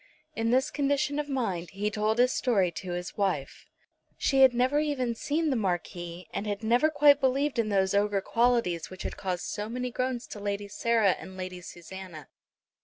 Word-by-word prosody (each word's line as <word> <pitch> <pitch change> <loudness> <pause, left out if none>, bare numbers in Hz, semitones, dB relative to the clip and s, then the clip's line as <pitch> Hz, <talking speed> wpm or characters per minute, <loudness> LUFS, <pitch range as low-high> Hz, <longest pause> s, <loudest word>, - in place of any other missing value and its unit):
In 225 0 0
this 255 +2 +2
condition 285 0 0
of 295 0 -3
mind 195 -11 -2
he 205 +2 -1
told 215 +2 0
his 250 +1 +4
story 195 -8 +2
to 180 +2 -6
his 175 0 -5
wife. 185 -9 -2 0.5
She 270 -1 +2
had 265 -1 +8
never 255 +4 +2
even 280 -6 0
seen 300 +6 -1
the - - +1
Marquis, 175 -3 -3
and 210 - -3
had 205 +1 -3
never 240 +7 +3
quite 290 -2 +5
believed 270 0 +1
in 220 -2 +1
those 190 -1 +2
ogre 205 0 +2
qualities 230 -7 +1
which 185 - -8
had - - -4
caused 180 -2 -3
so 210 +1 -4
many 250 +1 -3
groans 255 0 -2
to 210 - -7
Lady 205 0 -3
Sarah 220 0 +2
and 190 0 -10
Lady 185 -1 -6
Susanna. 175 -3 -10
220 Hz, 185 wpm, -28 LUFS, 190-255 Hz, 0.5 s, had